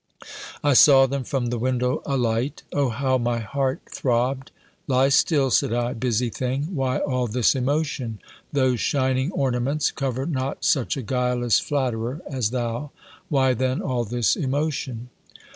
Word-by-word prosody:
I 145 -1 +4
saw 135 +1 +7
them 135 0 -2
from 120 -2 -2
the 120 - -2
window 125 +1 0
alight. 125 +1 -1
O 140 -3 +1
how 130 +2 0
my 120 0 0
heart 130 +4 -2
throbbed! 130 +2 -1 0.4
"Lie 130 0 +3
still," 140 -1 +3
said - - +2
I, 120 +1 0
"busy 120 -1 -1
thing! 135 - -3
why 130 -2 0
all 125 -2 -1
this 120 +1 +2
emotion? 135 -4 -1 0.3
Those 130 -4 +1
shining 130 +2 0
ornaments 135 0 0
cover 135 -2 -3
not 135 -4 -3
such 135 -1 +1
a 135 - -4
guileless 125 -1 +1
flatterer 130 -1 -2
as 130 -6 -1
thou. 120 +3 -3 0.4
Why 135 -4 +3
then 130 +2 -1
all 125 -3 -1
this 120 +1 +1
emotion?" 135 -4 -2
130 Hz, 145 wpm, -23 LUFS, 120-140 Hz, 0.4 s, saw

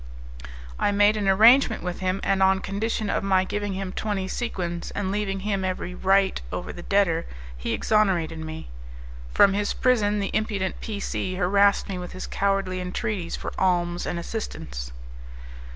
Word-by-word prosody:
I - - +2
made 205 +1 +4
an 205 -2 -1
arrangement 225 +5 +6
with 180 -1 -4
him; 185 +1 -1
and 195 -1 +1
on 190 0 +5
condition 215 +3 -2
of - - 0
my 190 -1 +3
giving 205 +1 -3
him 190 0 -4
twenty 200 -2 -2
sequins, 175 -6 -3
and 195 -2 -1
leaving 195 -1 -2
him 200 -1 -1
every 185 -1 -3
right 190 +1 +2
over 90 - -4
the 175 - -8
debtor, 175 -4 +1 0.3
he - - -4
exonerated 180 -7 +1
me. 160 - -7 0.6
From 195 - +5
his 205 +1 0
prison 215 -5 +2
the 200 - -2
impudent 205 -4 -1
P 210 -2 -4
C 185 -1 -3
harassed 200 +2 +3
me 190 -2 -4
with 180 -1 -7
his 185 - -6
cowardly 195 -2 0
entreaties 180 0 -3
for - - -6
alms 175 -2 +1
and 175 - -2
assistance. 65 - -5
195 Hz, 165 wpm, -25 LUFS, 180-205 Hz, 0.6 s, arrangement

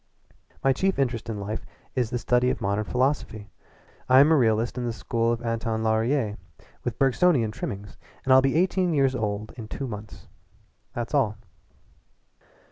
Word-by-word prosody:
My 135 - +4
chief 190 +8 0
interest 120 -4 -1
in 105 -2 -3
life 105 +2 -4 0.3
is 125 -4 0
the 120 - -1
study 125 +1 +2
of - - -1
modern 100 +2 -1
philosophy. 125 -5 -1 0.6
I 130 +1 +7
am 145 +3 +6
a - - +6
realist 115 -3 +2
of - - -2
the 120 -1 -2
School 115 0 0
of 120 0 -3
Anton 115 -1 -1
Laurier 110 0 +1 0.5
with 120 - -3
Bergsonian 135 -3 +3
trimmings 100 -1 -6 0.3
and 130 - +4
I'll 130 - +8
be 135 +1 +1
eighteen 180 0 +2
years 135 -2 +3
old 105 -3 -3
in 110 -3 -7
two 135 - -5
months. 105 -6 -8 0.7
That's 120 +2 -4
all." 110 -7 +2
120 Hz, 165 wpm, -26 LUFS, 110-135 Hz, 0.7 s, I'll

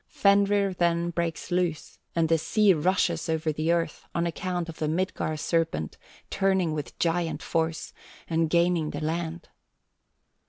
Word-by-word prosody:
Fenrir 200 0 +3
then 170 -1 +1
breaks 170 0 -3
loose, 175 -3 -1 0.2
and 165 -1 +2
the 165 0 +3
sea 210 +4 +4
rushes 180 +2 +1
over 160 0 0
the 155 +2 0
earth, 170 -1 -1
on 170 - +1
account 175 0 -2
of 165 - -9
the 155 - 0
Midgard 155 -2 -1
serpent 165 - -1 0.3
turning 190 -4 +1
with 150 -2 -5
giant 170 0 0
force, 160 -1 -2 0.3
and 165 -1 +1
gaining 170 -2 +2
the 145 - -4
land. 165 +1 -3
170 Hz, 145 wpm, -27 LUFS, 160-180 Hz, 0.3 s, sea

